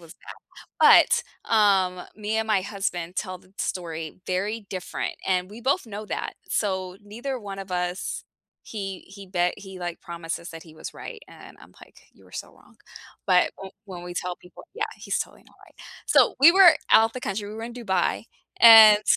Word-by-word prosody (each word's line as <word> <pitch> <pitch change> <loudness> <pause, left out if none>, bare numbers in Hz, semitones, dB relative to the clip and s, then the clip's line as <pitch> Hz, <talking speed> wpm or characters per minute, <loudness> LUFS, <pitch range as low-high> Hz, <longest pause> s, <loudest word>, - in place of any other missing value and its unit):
was 165 -2 -14 0.6
bad, - - +8 0.4
but, - - -12
um, 195 -4 +3
me 215 +1 -3
and 220 0 0
my 215 -3 +2
husband 185 -3 -4
tell 185 -3 -4
the 185 +1 -24
story 165 -2 -5
very 205 +4 -2
different 185 -2 -4
and 185 -1 0
we 220 +3 -10
both 275 +4 0
know 210 0 -7
that, - - -4 0.2
so 190 -3 -1
neither 240 +6 -5
one 200 -3 -8
of 195 -1 -8
us 180 +1 -3 0.4
he 195 -3 -6
he 200 +1 -12
bet 180 -1 0
he, 190 -2 -10
like, 175 -1 -5
promises 170 0 -6
that 165 -1 -10
he 160 -2 -16
was 155 - -9
right, 450 -3 -9
and - - -14
I'm - - -17
like, - - -17
"You - - -22
were - - -21
so - - -6
wrong," - - -23 0.5
but 180 -2 +4
wh 195 - -7 0.2
when 180 -3 -9
we 175 0 -8
tell 180 0 -3
people 180 - -15
yeah, 435 -1 -2
he's - - -3
totally - - -6
not - - -23
right. - - -22 0.3
So 430 - +4
we 300 +5 +10
were 365 -2 +8 0.2
out 225 +1 +6
the 255 - -6
country, 205 -1 -4
we 210 - -8
were 225 - -7
in 235 +1 -7
Dubai, 190 -6 -1 0.3
and 220 -2 +9
195 Hz, 195 wpm, -25 LUFS, 180-220 Hz, 0.6 s, we